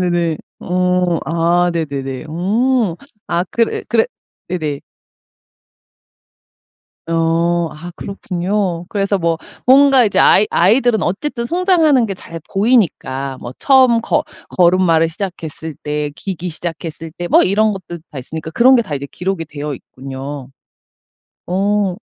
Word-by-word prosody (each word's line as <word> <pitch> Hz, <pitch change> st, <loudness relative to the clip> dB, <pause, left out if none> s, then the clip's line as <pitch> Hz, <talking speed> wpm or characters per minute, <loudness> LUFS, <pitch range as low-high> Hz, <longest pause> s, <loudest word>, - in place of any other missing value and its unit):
네네. 170 Hz, -3 st, 0 dB, 0.2 s
어 180 Hz, -1 st, +1 dB
아 170 Hz, +3 st, +2 dB
네네네. 140 Hz, -4 st, -3 dB
어 205 Hz, +4 st, +1 dB, 0.3 s
아 175 Hz, +1 st, 0 dB
그래, 230 Hz, -1 st, 0 dB
그래 230 Hz, -2 st, +3 dB, 0.4 s
네네. 155 Hz, -5 st, -3 dB, 2.3 s
어. 165 Hz, +1 st, +1 dB
아 165 Hz, +3 st, -9 dB
그렇군요. 185 Hz, -2 st, -2 dB
그래서 200 Hz, -1 st, 0 dB
뭐 165 Hz, -2 st, 0 dB, 0.3 s
뭔가 270 Hz, 0 st, +6 dB
이제 205 Hz, -, +1 dB
아이 210 Hz, -, +6 dB
아이들은 220 Hz, +4 st, +3 dB
어쨌든 235 Hz, +6 st, -2 dB
성장하는 335 Hz, -6 st, +3 dB
게 195 Hz, -, -4 dB
잘 165 Hz, -2 st, -9 dB
보이니까 180 Hz, -, +1 dB
뭐 120 Hz, -, -6 dB
처음 260 Hz, -4 st, +5 dB
거 -, -, 0 dB, 0.3 s
걸음마를 175 Hz, -2 st, +4 dB
시작했을 165 Hz, -4 st, -6 dB
때 150 Hz, 0 st, -2 dB
기기 180 Hz, -2 st, -5 dB
시작했을 165 Hz, -1 st, -6 dB
때 175 Hz, 0 st, -5 dB
뭐 -, -, +5 dB
이런 215 Hz, +3 st, +2 dB
것들 175 Hz, -3 st, -8 dB
다 145 Hz, -, -7 dB
있으니까 160 Hz, +5 st, -6 dB
그런 255 Hz, +8 st, +6 dB
게 -, -, +4 dB
다 150 Hz, -, -5 dB
이제 140 Hz, 0 st, -4 dB
기록이 185 Hz, -2 st, -3 dB
되어 145 Hz, -1 st, -5 dB
있군요. 135 Hz, +1 st, -8 dB, 1.0 s
어 195 Hz, +1 st, +1 dB
175 Hz, 255 characters per minute, -17 LUFS, 160-210 Hz, 2.3 s, 뭔가